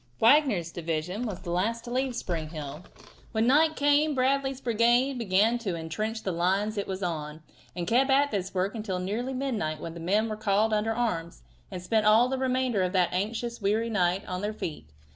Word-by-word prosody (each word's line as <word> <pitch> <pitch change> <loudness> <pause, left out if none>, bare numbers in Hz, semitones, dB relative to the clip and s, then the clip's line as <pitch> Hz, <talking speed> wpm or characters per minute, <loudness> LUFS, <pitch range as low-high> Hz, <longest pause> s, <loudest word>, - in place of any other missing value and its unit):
Wagner's 225 - +4
division 170 +7 -3
was 200 -5 -6
the 175 - -5
last 225 +7 -1
to 240 - -8
leave 255 0 -1
Spring 165 -8 -3
Hill. 150 0 -7 0.5
When 220 0 +2
night 310 +5 +4
came 290 +1 +3
Bradley's 270 +1 +1
brigade 240 +2 +2
began 220 +3 +2
to 195 -7 -3
intrench 215 +8 -4
the 190 - -1
line 190 +5 0
it 200 - -3
was 190 0 -4
on, 155 -2 -4 0.3
and 175 -1 -3
kept 255 +8 +2
at 280 +2 +3
this 190 -2 -2
work 190 +1 -1
until 210 -5 -3
nearly 220 +8 -3
midnight 225 - -2
when 165 +1 -6
the 170 - -8
men 205 +7 +1
were 215 - -3
called 215 +1 +1
under 215 +1 +1
arms, 180 -8 -2 0.3
and 180 -2 -7
spent 215 +2 +1
all 225 +4 +5
the 265 0 -2
remainder 255 -5 +1
of 185 0 0
that 180 -2 +2
anxious, 230 +5 -3
weary 220 +3 0
night 185 -1 +1
on 180 0 -4
their 210 +1 -2
feet. 150 - -6
215 Hz, 200 wpm, -27 LUFS, 180-240 Hz, 0.5 s, all